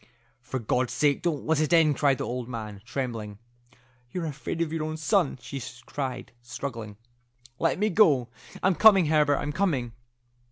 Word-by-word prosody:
"For 130 +1 -4
God's 125 +1 -1
sake 145 -2 +2
don't 160 -6 -2
let 160 -1 +2
it 155 -2 0
in," 165 -3 +5
cried 140 -1 +2
the - - -3
old 125 0 -4
man, 105 -4 -6
trembling. 115 -5 -4 0.7
"You're 175 +5 -4
afraid 150 +1 -5
of 165 -2 -1
your 160 -1 -2
own 155 0 -4
son," 160 -3 +1
she 135 +1 -7 0.2
cried, 130 -3 -5
struggling. 120 -4 -6 0.6
"Let - - +1
me 210 +2 +1
go. 150 - +4 0.4
I'm 190 - +4
coming, 195 -2 +6
Herbert; 150 -2 +3
I'm 145 - -3
coming." 145 - -1
145 Hz, 165 wpm, -27 LUFS, 125-160 Hz, 0.7 s, coming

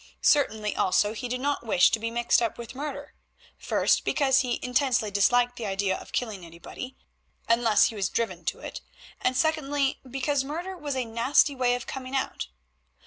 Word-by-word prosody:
Certainly 220 -8 +2
also 205 +3 +2
he 245 +3 -5
did 250 +1 -3
not 285 -1 -1
wish 185 -5 +4
to 225 - +1
be 230 +1 -2
mixed 240 +1 +2
up 230 - -1
with 235 0 -8
murder; 285 +1 -6 0.4
first, - - +1
because 270 -2 +3
he 250 -3 -1
intensely 250 -4 +1
disliked 245 +5 +3
the 225 - -4
idea 195 -1 0
of - - -10
killing 215 -7 -3
anybody, 170 +10 -9 0.5
unless 230 -2 +4
he 225 - -8
was 195 -3 -1
driven 230 -1 -2
to - - -2
it; - - -7 0.4
and 255 0 +1
secondly, 290 -4 +1
because 270 +2 0
murder 340 +7 -5
has 290 -2 -3
a 255 -2 -1
nasty 235 +6 +3
way 250 -2 +1
of 245 - -6
coming 265 0 -6
out. 270 - -2
245 Hz, 180 wpm, -27 LUFS, 225-275 Hz, 0.5 s, wish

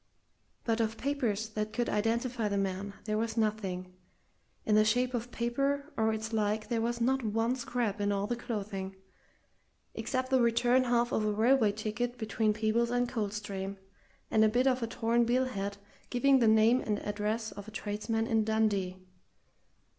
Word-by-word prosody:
But 230 -1 +1
of 225 0 -1
papers 235 -6 -1
that 215 0 -3
could 240 -1 0
identify 230 +2 0
the 200 -1 -1
man 195 +1 -2
there 215 0 0
was 225 0 -2
nothing 195 -4 -1 0.7
in 215 - +2
the 215 0 +6
shape 245 +4 +1
of 240 0 -3
paper 275 +6 -1
or 220 0 +2
its 220 +1 -4
like 215 0 0
there 230 -2 0
was 235 +1 -1
not 265 +3 +2
one 225 +3 +1
scrap 235 -5 -2
in 205 0 +1
all 200 0 0
the 240 - -1
clothing, 200 -5 -5 1.0
except 260 -1 -2
the 260 -1 +4
return 240 +2 +3
half 240 0 +2
of 215 - +1
a 215 - +1
railway 225 +1 +4
ticket 225 +4 -3
between 220 -1 0
Peebles 220 +2 +1
and 245 0 +1
Coldstream, 200 -3 -4 0.5
and 220 - +4
a 215 - +5
bit 245 +4 +2
of 260 -1 +2
a 230 - -1
torn 230 +1 +1
bill 250 +2 +2
head 200 -4 -4 0.3
giving 270 +2 +4
the 230 - +4
name 220 +3 +5
and 210 -1 -1
address 210 +2 -2
of 205 +1 -9
a - - -6
tradesman 215 +1 -2
in 225 -1 +2
Dundee. 210 -4 0
220 Hz, 175 wpm, -31 LUFS, 210-240 Hz, 1.0 s, the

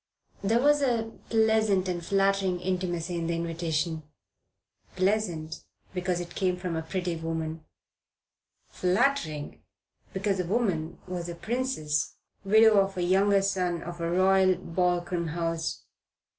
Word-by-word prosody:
There 225 +4 +3
was 290 +2 +4
a 230 -4 0 0.2
pleasant 220 -4 +3
and 175 -2 -2
flattering 195 -1 +1
intimacy 180 -2 -2
in 165 - -2
the 170 - 0
invitation: 165 -1 -2 0.9
pleasant 185 -5 -1 0.3
because 180 -1 -1
it 175 0 -6
came 185 -2 0
from 180 -2 -3
a 160 - -1
pretty 175 +1 -3
woman; 160 -1 -4 1.0
flattering 180 - 0 0.5
because 195 0 -1
the 180 - 0
woman 175 -7 0
was 175 -1 -4
a 170 - -5
princess, 220 - -1 0.3
widow 215 +1 +6
of 195 -1 0
a 180 - 0
younger 195 +2 +3
son 180 -3 0
of 175 0 -7
a 170 - -1
Royal 185 +1 +4
Balkan 175 -1 -1
house. 165 0 -2
180 Hz, 130 wpm, -28 LUFS, 170-195 Hz, 1.0 s, widow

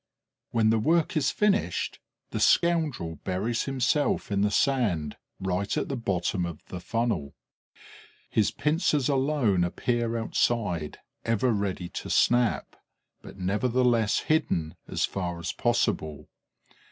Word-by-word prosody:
When 110 -2 +3
the 110 - +3
work 165 - +2
is 150 -2 +2
finished, 210 +3 0 0.3
the - - -2
scoundrel 155 - +2
buries 100 +9 -2
himself 135 -1 0
in 100 -1 +1
the 105 - +3
sand, 105 - +1 0.2
right 95 +1 -1
at - - -1
the 140 - -1
bottom 95 -5 -1
of 85 -3 -6
the 90 - -5
funnel; 110 -10 -2 0.9
his 110 - +2
pincers 150 -3 +1
alone 135 -9 +2
appear 115 +6 -1
outside, 105 -8 0 0.3
ever 115 +2 +1
ready 100 -4 -2
to - - -6
snap, 120 -2 +2 0.4
but - - -12
nevertheless 115 +3 +1
hidden 85 - 0
as - - 0
far 90 -3 -4
as 85 +1 -4
possible. 105 - -1
115 Hz, 125 wpm, -27 LUFS, 90-130 Hz, 0.9 s, When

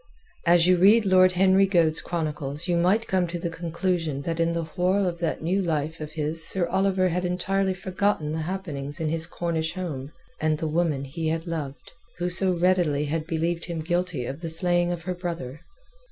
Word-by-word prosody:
As 170 0 +5
you 180 0 +4
read 205 +5 +5
Lord 185 -1 +5
Henry 190 +1 +4
Goade's 165 -4 +2
chronicles 150 -2 -3
you 175 - +1
might 185 +7 +2
come 185 -2 +1
to 170 +1 -4
the 170 0 -4
conclusion 165 -3 -2
that 165 +1 -3
in 165 0 +1
the 170 0 -1
whorl 185 +4 0
of 170 -2 -3
that 165 -2 -2
new 185 +4 +1
life 160 -2 -2
of 150 0 -7
his 155 +1 0
Sir 185 -2 +2
Oliver 190 +1 +1
had 180 +1 -1
entirely 190 +2 0
forgotten 185 -4 -1
the 160 - -2
happenings 155 -4 -4
in 160 -1 -1
his 160 0 -1
Cornish 165 -2 -2
home 150 -7 -5 0.3
and 155 0 +1
the 160 - -4
woman 155 -3 0
he 160 +4 -4
had 165 +1 -1
loved, 155 -5 -6 0.3
who 180 0 -2
so 185 +1 +3
readily 170 -5 +2
had 155 +2 -3
believed 165 +1 -1
him 170 -2 -4
guilty 175 -5 -1
of 135 +6 -6
the 165 - -4
slaying 175 +1 +3
of 170 -2 -4
her 180 - -3
brother. 170 -6 -6
170 Hz, 195 wpm, -25 LUFS, 160-185 Hz, 0.3 s, As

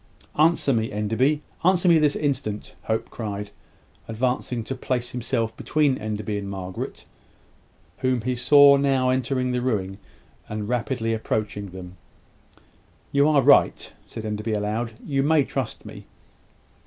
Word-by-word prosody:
"Answer 155 -2 +3
me, 110 -1 0
Enderby 120 +9 0 0.2
answer 185 0 +3
me 170 -2 +6
this 150 -1 +2
instant," 130 -8 -2
Hope 110 0 -2
cried, 105 -2 -5 0.6
advancing 125 +1 -1
to 135 - -4
place 125 -1 -3
himself 115 -2 -2
between 150 -3 +1
Enderby 105 -1 -3
and 100 -1 -6
Margaret, 95 -2 -6 0.9
whom 130 -2 +1
he 125 +3 -1
saw 140 +3 +6
now 135 -2 +2
entering 130 0 0
the 125 0 -1
ruin, 100 -6 -2 0.5
and 105 -1 -4
rapidly 120 -1 -1
approaching 105 -2 -3
them. 90 0 -10 1.1
"You 140 +2 +4
are 145 -3 +4
right," 140 - +4
said 110 - -7
Enderby, 105 +1 -3
aloud. 110 +3 -2
"You 135 -2 0
may 150 +1 +3
trust 130 -3 -4
me." - - -11
120 Hz, 135 wpm, -24 LUFS, 105-135 Hz, 1.1 s, me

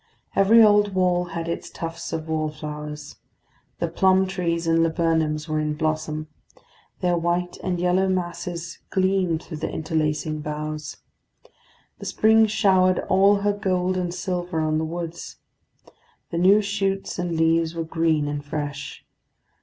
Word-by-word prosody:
Every 220 +4 +6
old 205 -2 +4
wall 180 -1 +2
had 165 -1 -5
its 170 - -4
tufts 165 0 -6
of 160 -1 -4
wallflowers. 150 -1 -5 0.6
The - - -1
plum 190 0 +3
trees 175 -3 -2
and 165 0 +3
laburnums 160 -2 +1
were 155 -1 -1
in 150 0 -1
blossom; 155 0 -2 0.7
their 180 -1 +2
white 175 +1 -1
and 180 -1 -1
yellow 180 +2 +2
masses 175 -1 -3
gleamed 185 -3 +1
through 160 - -7
the 160 - -3
interlacing 155 -1 -1
boughs. 150 0 -5 1.0
The - - -7
spring 220 0 +4
showered 190 -4 +3
all 200 +1 +4
her 205 0 +2
gold 185 -2 0
and 180 -1 -1
silver 175 -1 -3
on 155 0 +1
the 160 - -1
woods. 170 +1 -6 1.0
The 170 - -1
new 200 +4 +5
shoots 195 -2 -2
and 175 -1 -2
leaves 165 0 +2
were 165 - -2
green 160 -2 +1
and 145 0 -3
fresh. 145 -1 -5
170 Hz, 140 wpm, -24 LUFS, 155-185 Hz, 1.0 s, Every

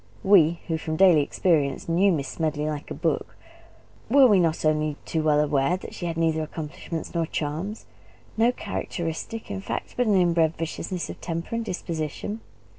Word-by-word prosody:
We 170 -4 +5
who 160 -2 -1
from 155 0 -3
daily 175 -3 +6
experience 145 -1 +1
knew 180 +4 +3
Miss 140 -6 -1
Smedley 155 -2 -2
like 150 -1 -4
a - - -5
book - - -2 0.7
were 275 +2 +7
we 210 -6 +6
not 165 -2 +1
only 155 -1 +1
too 160 - -1
well 150 -1 +3
aware 150 +3 +2
that - - -10
she 175 - -4
had 165 -1 -3
neither 160 -1 +1
accomplishments 155 +1 -6
nor 165 -2 0
charms, 160 +10 -4 0.5
no 230 +2 +4
characteristic, 175 -1 -5
in 195 - -4
fact, - - -4
but 245 -1 +1
an 210 - +4
inbred 170 -3 +3
viciousness 170 +2 -4
of - - -12
temper 170 +4 -4
and 230 0 -1
disposition? 175 +3 -4
165 Hz, 175 wpm, -25 LUFS, 155-185 Hz, 0.7 s, were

